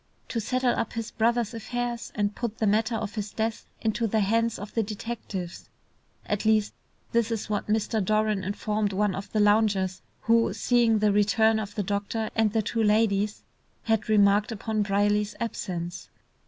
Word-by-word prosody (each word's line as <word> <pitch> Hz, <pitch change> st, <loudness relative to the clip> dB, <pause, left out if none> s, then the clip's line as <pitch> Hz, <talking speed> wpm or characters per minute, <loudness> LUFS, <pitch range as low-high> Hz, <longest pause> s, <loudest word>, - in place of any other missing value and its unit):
"To 230 Hz, -, -1 dB
settle 255 Hz, +3 st, +1 dB
up 230 Hz, -, -2 dB
his 230 Hz, -1 st, -4 dB
brother's 235 Hz, 0 st, +1 dB
affairs, 240 Hz, +1 st, -4 dB
and 205 Hz, -1 st, 0 dB
put 230 Hz, -1 st, -4 dB
the 220 Hz, -, 0 dB
matter 220 Hz, +3 st, +2 dB
of 215 Hz, -2 st, -3 dB
his 210 Hz, -2 st, -4 dB
death 220 Hz, 0 st, -3 dB
into 225 Hz, +1 st, 0 dB
the 220 Hz, +1 st, +1 dB
hands 230 Hz, +3 st, +1 dB
of 205 Hz, +1 st, -8 dB
the 225 Hz, -, +1 dB
detectives." 210 Hz, -4 st, -6 dB, 0.6 s
At 205 Hz, -1 st, -1 dB
least 220 Hz, -1 st, +2 dB, 0.4 s
this 235 Hz, -1 st, +2 dB
is 225 Hz, -2 st, -3 dB
what 205 Hz, -, -1 dB
Mr. 215 Hz, 0 st, 0 dB
Doran 215 Hz, 0 st, +1 dB
informed 210 Hz, +1 st, -1 dB
one 205 Hz, 0 st, +1 dB
of 195 Hz, +2 st, -6 dB
the 215 Hz, -, 0 dB
loungers 205 Hz, -3 st, +2 dB, 0.2 s
who, 230 Hz, 0 st, +3 dB
seeing 235 Hz, -3 st, +3 dB
the 210 Hz, 0 st, +3 dB
return 220 Hz, +2 st, +3 dB
of 205 Hz, -1 st, -6 dB
the 205 Hz, -, -1 dB
doctor 205 Hz, +3 st, -2 dB
and 220 Hz, -2 st, +3 dB
the 220 Hz, 0 st, +1 dB
two 225 Hz, +2 st, -1 dB
ladies, 210 Hz, -1 st, +2 dB, 0.4 s
had 225 Hz, -1 st, 0 dB
remarked 205 Hz, 0 st, +4 dB
upon 220 Hz, 0 st, -2 dB
Brierly's 205 Hz, +1 st, +1 dB
absence. 175 Hz, -6 st, -4 dB
215 Hz, 170 wpm, -27 LUFS, 205-225 Hz, 0.6 s, remarked